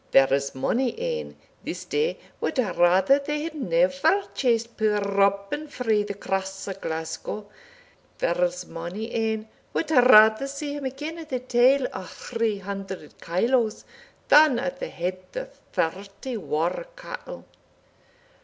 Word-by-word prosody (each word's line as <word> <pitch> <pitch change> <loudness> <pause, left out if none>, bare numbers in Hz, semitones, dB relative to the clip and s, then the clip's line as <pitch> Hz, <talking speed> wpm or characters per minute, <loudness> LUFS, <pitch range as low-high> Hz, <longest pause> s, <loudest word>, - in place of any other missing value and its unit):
There's 135 +1 +3
mony 245 - 0
ane 480 -1 -3 0.3
this - - -5
day 455 +2 0 0.2
wad - - -2
rather 190 +2 +4
they 295 +1 -3
had 330 0 -4
never 330 - +2
chased 235 -2 0
puir 215 -2 +2
Robin 200 +7 +1
frae 225 -7 +1
the 205 -1 -4
Cross 195 0 -3
o' - - -2
Glasgow 160 +3 -5 0.7
there's 175 +1 0
mony 175 +8 -6
ane 220 -1 -1 0.3
wad 320 - -1
rather 245 -2 +7
see 285 +1 -4
him 290 -1 -5
again 295 +5 -5
at 320 -2 -9
the 255 - 0
tale 255 +2 +3
o' 190 - -4
three 225 +4 -2
hundred 195 -4 -7
kyloes, 225 +5 +1 0.4
than 295 -4 +7
at 270 +2 -3
the - - -4
head 185 +2 -3
o' - - -3 0.3
thirty 195 +9 -3
waur 175 - -1
cattle." - - -8
225 Hz, 135 wpm, -25 LUFS, 190-280 Hz, 0.7 s, rather